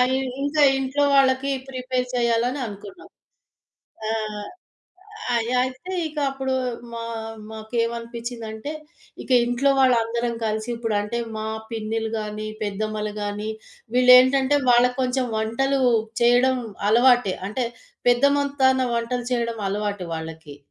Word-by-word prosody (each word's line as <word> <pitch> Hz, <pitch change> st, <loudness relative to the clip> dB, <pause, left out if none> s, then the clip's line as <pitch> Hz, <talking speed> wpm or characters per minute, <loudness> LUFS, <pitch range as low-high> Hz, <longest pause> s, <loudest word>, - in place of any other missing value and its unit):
ఇ -, -, +2 dB, 0.3 s
ఇంకా 290 Hz, +1 st, +2 dB
ఇంట్లో 270 Hz, +2 st, 0 dB
వాళ్ళకి 270 Hz, 0 st, +3 dB, 0.2 s
ప్రిపేర్ 255 Hz, -1 st, -2 dB
చెయ్యాలని 240 Hz, +3 st, +1 dB
అనుకున్నాం. 200 Hz, -2 st, -10 dB, 1.0 s
ఆ! -, -, -1 dB, 1.3 s
అయ్ 230 Hz, 0 st, 0 dB
అయితే 260 Hz, +9 st, -4 dB
ఇక 305 Hz, 0 st, -13 dB
అప్పుడు 265 Hz, -1 st, -2 dB, 0.4 s
మా 230 Hz, 0 st, -5 dB, 0.5 s
మాకేమనిపించిందంటే 230 Hz, +2 st, -4 dB, 0.5 s
ఇక -, -, -8 dB
ఇంట్లో 245 Hz, +3 st, +1 dB
వాళ్ళందరం 235 Hz, -2 st, +2 dB
కలిసి 215 Hz, +1 st, -2 dB
ఇప్పుడంటే 225 Hz, -1 st, -2 dB, 0.2 s
మా 215 Hz, -, -4 dB, 0.3 s
పిన్నిలు 225 Hz, 0 st, -2 dB
గాని, 215 Hz, 0 st, -5 dB, 0.2 s
పెద్దమ్మలు 210 Hz, +1 st, -3 dB
గాని 205 Hz, +1 st, -3 dB, 0.5 s
వీళ్ళేంటంటే 260 Hz, +2 st, +6 dB
వాళ్ళకొంచెం 250 Hz, +1 st, +3 dB
వంటలు 265 Hz, +5 st, 0 dB, 0.4 s
చేయడం 245 Hz, +2 st, +4 dB, 0.3 s
అలవాటే. 240 Hz, -3 st, +4 dB
అంటే 235 Hz, +4 st, -2 dB, 0.4 s
పెద్దమొత్తాన 280 Hz, 0 st, +3 dB
వంటలు 240 Hz, +1 st, -2 dB
చేయడం 235 Hz, -2 st, -1 dB
అలవాటు 205 Hz, -2 st, -3 dB
వాళ్ళకి. 160 Hz, -2 st, -8 dB
240 Hz, 100 wpm, -23 LUFS, 220-260 Hz, 1.3 s, వీళ్ళేంటంటే